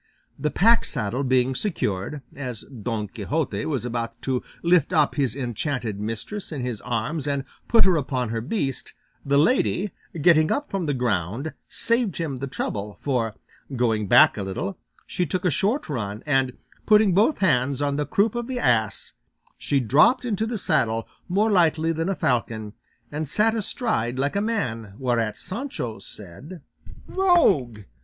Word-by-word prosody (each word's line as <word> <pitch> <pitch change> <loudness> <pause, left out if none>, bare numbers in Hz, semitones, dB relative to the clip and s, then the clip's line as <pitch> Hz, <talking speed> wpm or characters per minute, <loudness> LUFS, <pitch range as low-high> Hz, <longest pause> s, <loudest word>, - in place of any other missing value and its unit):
The 150 - 0
pack 230 +9 +4
saddle 125 +1 -2
being 130 0 +2
secured, 130 - -2
as 125 -6 -5
Don 115 -4 -4
Quixote 110 +1 -2
was 135 -6 -2
about 115 -1 -3
to 130 -2 0 0.2
lift 170 -1 +3
up 155 -3 +3
his 130 -6 0
enchanted 125 -4 -3
mistress 115 - -4
in 140 -5 -4
his 120 -4 -3
arms 125 +6 -2
and 140 -1 0 0.2
put 230 - +5
her 185 -3 +4
upon 130 -5 -1
her 115 0 -2
beast, 135 - -3 0.3
the 140 0 +2
lady, 205 - +2 0.3
getting 155 0 +5
up 290 +1 -1
from 190 -5 -2
the 145 - 0
ground, 120 - -1
saved 230 -5 +1
him 155 -6 -2
the 135 +2 -4
trouble, 105 -5 -4
for, 115 -6 -1 0.4
going 110 -4 +1
back 120 +2 +6
a - - -2
little, 155 - -3 0.3
she 180 - -2
took 185 +5 -2
a 180 - +3
short 210 - 0
run, 105 -6 -4
and 135 -3 +1 0.3
putting 210 -3 +5
both 215 - +3
hands 140 -7 +2
on 145 -1 0
the 145 -1 -1
croup 200 +8 +2
of 240 -1 -3
the 260 -1 -3
ass 110 - +1 0.5
she 140 - +1
dropped 150 - +4
into 220 -1 -1
the 230 0 -2
saddle 115 - +1 0.2
more 210 +5 +2
lightly 165 -3 +3
than 165 +2 -1
a 195 - 0
falcon, 110 -6 -1 0.4
and 150 -1 -3
sat 215 +7 +3
astride 210 - -1
like 140 +5 0
a 200 - +2
man, 115 - -2
whereat 115 -4 0
Sancho 185 - -4
said, 135 - -9 0.4
"Rogue! 325 - +3
140 Hz, 165 wpm, -24 LUFS, 115-185 Hz, 0.5 s, back